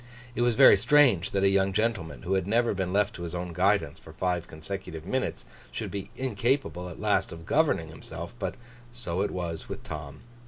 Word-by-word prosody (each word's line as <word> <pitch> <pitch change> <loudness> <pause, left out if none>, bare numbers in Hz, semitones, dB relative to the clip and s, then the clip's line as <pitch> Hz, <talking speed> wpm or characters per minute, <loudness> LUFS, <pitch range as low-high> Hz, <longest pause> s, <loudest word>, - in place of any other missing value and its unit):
It 120 - -2
was 120 -1 +3
very 100 - +8
strange 130 - +4
that 100 -1 0
a - - +6
young 95 0 +2
gentleman 110 -7 -1
who 95 +1 -1
had 95 -1 0
never 115 +2 +2
been 95 -2 -2
left 105 +2 +2
to - - -8
his 85 0 -5
own 90 0 -4
guidance 95 -3 +1
for - - -13
five 90 -2 -1
consecutive 80 0 -7
minutes, 130 +7 -2 0.3
should - - -4
be 100 -1 -5
incapable 120 -6 -1
at 85 - -10
last - - +1
of 80 0 -9
governing 145 - +2
himself; - - -8
but - - -3 0.4
so 95 -7 -2
it 100 - +1
was 85 -3 -4
with - - -6
Tom. 75 -2 -7
95 Hz, 200 wpm, -28 LUFS, 85-110 Hz, 0.4 s, very